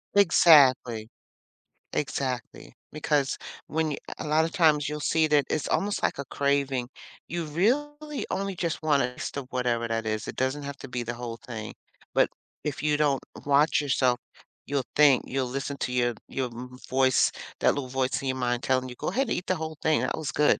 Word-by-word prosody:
Exactly. 135 - +5 0.8
Exactly, 130 -3 -3 0.2
because 145 -2 0 0.3
when 160 0 0
you 145 - -3 0.2
a - - -3
a - - -5
lotta 160 +2 +3
times 155 -6 +3
you'll 150 0 -4
see 160 +1 +2
that 150 -3 +3
it's 155 - -1
almost 205 +1 0
like - - +1
a 140 - -4
craving, 140 -2 0 0.4
you 170 0 -2
really 295 - -1
only 195 0 -1
just 170 -2 -2
want 145 -3 +3
it 125 0 -2
as - - -4
to 140 - -4
whatever 125 -2 -1
that 115 0 -2
is, 110 -1 -2
it - - -5
doesn't 130 +3 -1
have 140 0 -5
to 140 - -9
be 125 -1 -3
the 120 +1 -4
whole 120 -1 -6
thing. 115 -3 -7 0.4
But - - +4 0.4
if 150 -1 -3
you 150 -1 +2
don't 145 -3 +2 0.2
watch 145 +3 +4
yourself, 130 -3 +2 0.5
you'll 140 -2 -1
think 145 -4 +6
you'll 135 0 -1
listen 135 +2 -4
to 130 - -2
your 120 -2 +1
your 130 -1 -2
m 125 +2 -9
voice, 130 0 +3 0.3
that - - +4
little 140 -3 -3
voice 130 0 0
in 135 - -4
your 130 0 -1
mind 120 -1 -1
telling 130 -1 +1
you, 125 - -8
"Go - - -5
ahead 260 -1 0
eat 180 - -1
the 185 - +2
whole 160 -2 -5
thing. 155 -1 +2
That - - -1
was 160 -3 -3
good." 150 - +3
140 Hz, 200 wpm, -27 LUFS, 125-155 Hz, 0.8 s, think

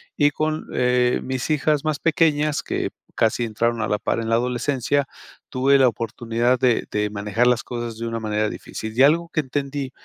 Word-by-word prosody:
y 145 -1 +4
con, 155 +1 -2
eh, 125 0 +2
mis 130 +2 -3
hijas 150 -1 +1
más 155 -1 0
pequeñas, 155 -2 +2
que - - -3 0.2
casi 115 +1 +1
entraron 115 +1 -1
a - - 0
la 105 - 0
par - - -1
en 115 0 -3
la 115 - +3
adolescencia, 125 +3 0 0.4
tuve 135 +1 +3
la 130 - +6
oportunidad 115 +2 0
de 125 -3 +2
de 105 0 0
manejar 105 +3 0
las 125 0 +2
cosas 120 -2 -5
de 115 - -4
una 115 0 -3
manera 110 -1 -1
difícil. 110 +1 -6
Y 130 - +2
algo 165 +4 +4
que - - +1
entendí 140 -1 -3
125 Hz, 190 wpm, -22 LUFS, 115-145 Hz, 0.4 s, la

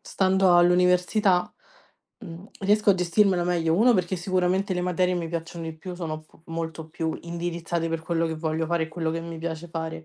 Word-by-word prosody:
stando 190 -2 +3
all'università, 180 +2 +3 0.7
mhmm, 175 0 -10
riesco 205 +1 +3
a - - +5
gestirmela 180 0 +2
meglio. 165 -2 +1
1 240 +4 +5
perché 185 0 0
sicuramente 185 +1 0
le 180 - -1
materie 180 0 +1
mi 170 -2 -3
piacciono 165 0 -5
di 160 0 -6
più, 180 +3 -7
sono 160 -3 -5
p 155 - -24
molto 165 -1 -5
più 160 0 -3
indirizzate 170 0 -3
per 165 - -2
quello 165 0 0
che 160 - -3
voglio 160 0 -1
fare 170 -1 0
e - - -10
quello 160 0 -2
che 165 - -3
mi 165 0 -7
piace 165 +1 -5
fare. 160 0 -5
170 Hz, 190 wpm, -25 LUFS, 165-180 Hz, 0.7 s, a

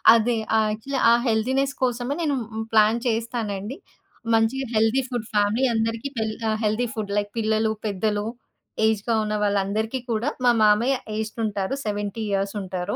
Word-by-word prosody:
అదే. 230 +1 +2 0.2
ఆహ్, 220 -1 +3
యాక్చువల్లీ 260 +6 -3
ఆ - - +7
హెల్తీనెస్ 260 +5 +1
కోసమే 245 +1 0
నేను 295 -4 +1
హ్మ్, 220 0 -5
ప్లాన్ 220 +1 +5
చేస్తానండి. 225 0 -2 0.6
మంచిగా 225 +4 +2
హెల్తీ 225 +4 +3
ఫుడ్ 240 -4 -3
ఫ్యామిలీ 210 +4 +2
అందరికి 225 +3 -1
తెల్ 220 -1 -1 0.2
ఆహ్, 215 - +1
హెల్తీ 215 +3 +1
ఫుడ్ 215 -4 -4
లైక్ 205 0 0
పిల్లలు, 220 0 +1
పెద్దలు, 205 +1 -1 0.6
ఏజ్డ్‌గా 220 +1 +1
ఉన్న 210 0 -2
వాళ్ళందరికీ 205 +4 0
కూడా, 230 +5 0
మా 245 - +6
మామయ్య 215 +6 +4 0.2
ఏజ్డ్ 220 +1 -4
ఉంటారు. 200 +1 -2
70 205 +1 -3
ఇయర్స్ 195 0 0
ఉంటారు. 185 +1 -3
220 Hz, 155 wpm, -24 LUFS, 210-235 Hz, 0.6 s, ఆ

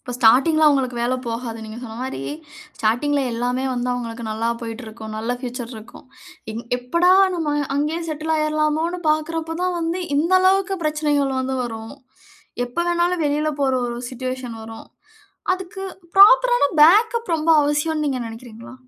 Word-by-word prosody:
இப்போ 245 - -7
ஸ்டார்ட்டிங்கில 270 +7 +5
அவங்களுக்கு 265 -4 +2
வேலை 245 +2 0
போகாது. 230 0 -4
நீங்க 220 +1 -8
சொன்ன 225 -3 -8
மாரி, 255 - -4 0.6
ஸ்டார்ட்டிங்கில 275 +6 +1
எல்லாமே 245 +2 -1
வந்து 245 0 -2
அவங்களுக்கு 235 -1 -5
நல்லா 220 +2 -2
போய்ட்டுருக்கும். 225 -2 -7
நல்ல 225 +2 -3
ஃபியூச்சர் 245 -1 -6
இருக்கும். 220 +1 -13 0.5
எங் 230 +2 -5 0.2
எப்படா 340 +9 +2 0.2
நம்ம 315 -4 -1 0.2
அங்கயே 300 +3 0
செட்டில் 310 +1 -2
ஆயிறலாமோனு 305 +3 0
பாக்குறப்ப 325 +1 -2
தான் 365 -1 0
வந்து, 335 +2 -2 0.2
இந்த 330 +5 +1
அளவுக்கு 385 +1 +2
பிரச்சனைகள் 295 -3 0
வந்து 260 0 -2
வரும். 225 -1 -7 0.7
எப்ப 295 +8 -2
வேணாலும், 345 0 +1
வெளில 300 +1 0
போற 270 -1 +2
ஒரு 240 0 -4
சிட்டுவேஷன் 255 -1 -5
வரும். 225 0 -10 0.7
அதுக்கு, 375 +1 -8 0.3
ப்ராப்பர் - - +7
ஆன 285 - +3
பேக்கப் 440 +5 +4
ரொம்ப 315 +1 0
அவசியம்ணு 300 +2 0
நீங்க 265 -3 -1
நெனைக்கிறீங்களா? 230 +1 -10
280 Hz, 145 wpm, -21 LUFS, 240-325 Hz, 0.7 s, ப்ராப்பர்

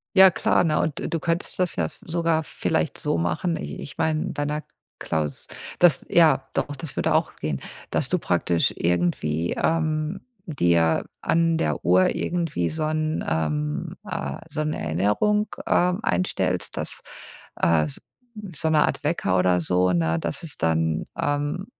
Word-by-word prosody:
Ja 190 0 +9
klar, 180 - +2
ne, 155 -2 +2
und 155 +1 -3
du 165 - +1
könntest 170 0 -1
das 180 -1 +1
ja 80 -3 +1
v - - -15
sogar 165 -1 +1
vielleicht - - -1
so - - -1
machen, 85 - 0
i - - -6
ich 140 - -9
mein, 160 +3 0
bei 145 - -2
'ner 150 +1 -2 0.4
Klaus 75 -3 -3 0.3
das 170 -7 +5
ja, 165 -2 +4
doch, 145 - -2
das 140 +1 -6
würde - - +1
auch - - +1
gehen, 75 -3 -3 0.3
dass - - +1
du - - +1
praktisch 85 -1 +1
irgendwie, 85 -2 0
ähm, 155 +2 0 0.3
dir 85 - +2 0.2
an 165 0 +2
der 75 - -1
Uhr 90 +1 +4
irgendwie 165 - -1
so 160 0 -3
'n 155 0 -1
ähm, 75 -2 -1
äh, - - -4
so - - -5
'n 155 0 -1
Erinnerung, 105 - +1 0.2
ähm, 180 +2 +2
einstellst, 185 - 0
dass, - - -2 0.6
äh, 80 -2 +2 0.7
so 160 +2 0
'ne 155 - +4
Art - - -3
Wecker 150 - 0
oder 90 -1 +3
so, 90 +2 +2
ne, 80 -1 +1
dass 85 - -4
es 160 - -4
dann, 80 -1 +1 0.2
ähm, 145 +6 -1
145 Hz, 160 wpm, -24 LUFS, -, 0.7 s, Ja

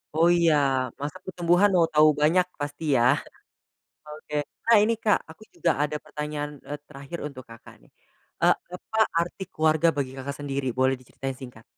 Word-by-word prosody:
Oh 165 +2 +4
iya 165 -2 +4 0.5
masa 145 +1 -4
pertumbuhan 175 +2 +3
mau 170 -2 +4
tahu 150 +1 +6
banyak 175 +4 +4
pasti 145 +2 -5
yah, 125 +3 +5 0.9
oke 150 0 -9 0.3
nah 230 - +7
ini 230 - +2
Kak 210 -2 +4
aku 165 - -15
juga 170 - +1
ada 150 +1 -1
pertanyaan, 150 -1 -4 0.2
eee, 145 +1 -5
terakhir 140 +3 -9
untuk 135 -3 -9
Kakak 115 -1 -13
nih, - - -24 0.5
eee, - - +6 0.2
apa 220 +4 -6 0.2
arti 175 +3 -4
keluarga 160 +1 +3
bagi 135 -2 -1
Kakak 140 +2 -5
sendiri? 140 -1 -3
Boleh 130 0 +3
diceritain 130 +2 -6
singkat? 125 -3 -11
150 Hz, 165 wpm, -26 LUFS, 140-170 Hz, 0.9 s, nah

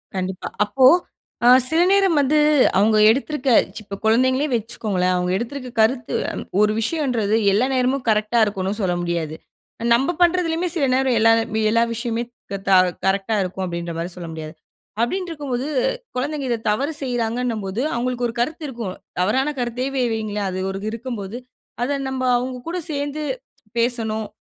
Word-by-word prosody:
கண்டிப்பா. 185 0 -3 0.2
அப்போ, 255 +5 +2 0.6
அ - - +6 0.2
சில 320 +2 +3
நேரம் 390 -5 +4
வந்து 300 +3 +2 0.4
அவுங்க 215 +2 +4
எடுத்துருக்க 270 +2 0 0.3
இப்ப 200 -1 -8
குழந்தைங்களே 260 +5 +3
வச்சிக்கோங்களேன். 205 -5 -1
அவுங்க 180 0 0
எடுத்திருக்க 255 +3 -5
கருத்து 240 +2 +1 0.5
ஒரு 210 0 +4
விஷயம்ன்றது 235 -7 0 0.2
எல்லா 215 +6 +3
நேரமும் 255 +1 +1
கரெக்ட்டா 215 +2 +2
இருக்கும்ன்னு 200 +1 -3
சொல்ல 180 -2 0
முடியாது. 165 -3 -2 0.6
நம்ப 270 +8 +2
பண்றதுலயும 350 0 +2
சில 290 -5 +2
நேரம் 260 -2 +2
எல்லா 225 +1 +5 0.4
எல்லா 230 +1 +3
விஷயம் 230 0 -3
மே 235 - -1 0.3
க - - -2
த - - +2 0.3
கரரெக்ட்டா 195 +3 +1
இருக்கும், 185 +1 -4
அப்படின்ற 170 -1 -4
மாதிரி 170 +2 -4
சொல்ல 175 -2 -7
முடியாது. 155 -1 -7 0.5
அப்டின்ருக்கும்போது, 290 -4 -2 0.5
குழந்தைங்க 280 +2 -2
இத 235 - +2 0.2
தவறு 280 +9 -1
செய்றாங்கண்ணும்போது 235 -4 -2
அவங்களுக்கு 245 0 -1
ஒரு 230 - -6
கருத்து 310 +6 -2
இருக்கும். 230 -8 -5 0.3
தவறான 265 +10 +1
கருத்தே 245 +2 -2
வெ 255 - +1
வையுங்களேன். 210 -2 -2
அது 190 +2 -3
இருக்கும்போது, 230 -3 -5 0.5
அத 280 +3 0
நம்ப 260 -1 -3
அவுங்க 250 0 -4
கூட 355 +2 -2
சேந்து 290 +1 -3 0.6
பேசணும், 220 -3 -1
235 Hz, 145 wpm, -21 LUFS, 205-265 Hz, 0.6 s, அ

